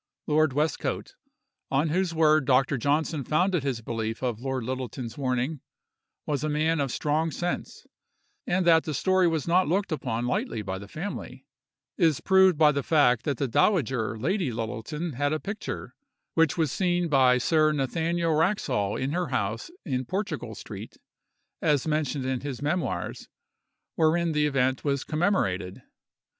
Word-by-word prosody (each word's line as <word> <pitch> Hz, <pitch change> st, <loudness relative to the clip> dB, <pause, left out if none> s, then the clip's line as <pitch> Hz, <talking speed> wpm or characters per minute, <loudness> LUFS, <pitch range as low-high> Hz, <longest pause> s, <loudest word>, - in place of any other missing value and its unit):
Lord 155 Hz, -2 st, +2 dB
Westcote, 150 Hz, +3 st, -1 dB, 0.6 s
on 140 Hz, +4 st, +1 dB
whose 180 Hz, +2 st, +1 dB
word 155 Hz, -3 st, +3 dB
Dr. 135 Hz, +1 st, +3 dB
Johnson 150 Hz, +3 st, 0 dB
founded 175 Hz, +4 st, +1 dB
his 130 Hz, -4 st, -2 dB
belief 115 Hz, 0 st, -4 dB
of 120 Hz, -4 st, -1 dB
Lord 130 Hz, -1 st, -3 dB
Littleton's 125 Hz, -1 st, -5 dB
warning, 130 Hz, +2 st, -1 dB, 0.6 s
was 145 Hz, -1 st, -1 dB
a 155 Hz, -, 0 dB
man 155 Hz, +2 st, +1 dB
of 140 Hz, -3 st, 0 dB
strong 155 Hz, +4 st, 0 dB
sense; 175 Hz, +3 st, -4 dB, 0.6 s
and 180 Hz, 0 st, +1 dB
that 165 Hz, -2 st, +5 dB
the 155 Hz, -, -3 dB
story 185 Hz, +2 st, +3 dB
was 160 Hz, -3 st, -1 dB
not 180 Hz, +2 st, +3 dB
looked 190 Hz, +4 st, 0 dB
upon 120 Hz, -6 st, -2 dB
lightly 115 Hz, -3 st, -2 dB
by 95 Hz, -1 st, -4 dB
the 100 Hz, -, -10 dB
family, 175 Hz, -, -6 dB, 0.5 s
is 160 Hz, -6 st, +3 dB
proved 190 Hz, -3 st, +4 dB
by 150 Hz, -1 st, +6 dB
the 140 Hz, -1 st, -1 dB
fact 125 Hz, -6 st, +3 dB
that 145 Hz, -4 st, -1 dB
the 140 Hz, -, 0 dB
dowager 130 Hz, -, +1 dB
Lady 165 Hz, -, 0 dB
Littleton 115 Hz, +8 st, -4 dB
had 145 Hz, +4 st, 0 dB
a 155 Hz, -, -1 dB
picture—which 165 Hz, -5 st, -3 dB
was 160 Hz, -5 st, +1 dB
seen 175 Hz, 0 st, +1 dB
by 130 Hz, -4 st, +4 dB
Sir 155 Hz, +4 st, +3 dB
Nathaniel 165 Hz, +4 st, 0 dB
Wraxhall 155 Hz, -, +1 dB
in 135 Hz, +2 st, -2 dB
her 175 Hz, +2 st, -1 dB
house 110 Hz, -, -2 dB, 0.2 s
in 130 Hz, -2 st, -2 dB
Portugal 195 Hz, -, -3 dB
street, -, -, -9 dB, 0.6 s
as 150 Hz, -7 st, +2 dB
mentioned 150 Hz, -3 st, -1 dB
in 130 Hz, -1 st, -1 dB
his 140 Hz, -4 st, -5 dB
memoirs—wherein 165 Hz, +1 st, -2 dB
the 150 Hz, -1 st, +2 dB
event 130 Hz, -2 st, +1 dB
was 140 Hz, -2 st, 0 dB
commemorated. 100 Hz, -, -1 dB
150 Hz, 150 wpm, -27 LUFS, 130-165 Hz, 0.6 s, by